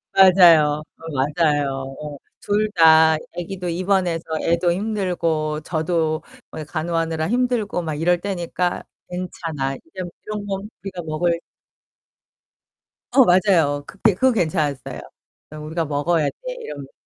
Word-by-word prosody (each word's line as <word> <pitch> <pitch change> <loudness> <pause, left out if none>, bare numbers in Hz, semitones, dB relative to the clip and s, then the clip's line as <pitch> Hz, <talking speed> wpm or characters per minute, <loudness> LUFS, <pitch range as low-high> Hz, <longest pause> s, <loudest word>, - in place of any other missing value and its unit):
맞아요. 170 -6 +6
어 - - -26
맞아요. 140 -2 0
어. 150 -1 -7 0.2
둘 210 +1 0
다 160 -1 +6 0.2
애기도 180 +1 -5
입원해서 180 -1 0 0.2
애도 170 +1 +2
힘들고 170 -6 -1
저도 160 -1 -1 0.3
뭐 155 - -6
간호하느라 160 +1 -2
힘들고 240 -6 0
막 155 -2 -3
이럴 175 +3 +2
때니까 180 -2 -2 0.3
'괜찮아. 165 -6 -4
이제 180 +6 -9 0.2
이런 210 -1 -5
건 195 +1 -4
우리가 190 -3 -5
먹을' 160 +2 0 1.8
어 265 - +7
맞아요. 175 -7 +3
그때 200 +4 +1
그거 260 +5 +3
괜찮았어요. 155 - -1 0.5
그냥 155 0 -9
'우리가 160 +1 -2
먹어야 150 +2 +1
돼.' - - -8
이러면서. 140 -2 -8
170 Hz, 275 characters per minute, -21 LUFS, 155-185 Hz, 1.8 s, 어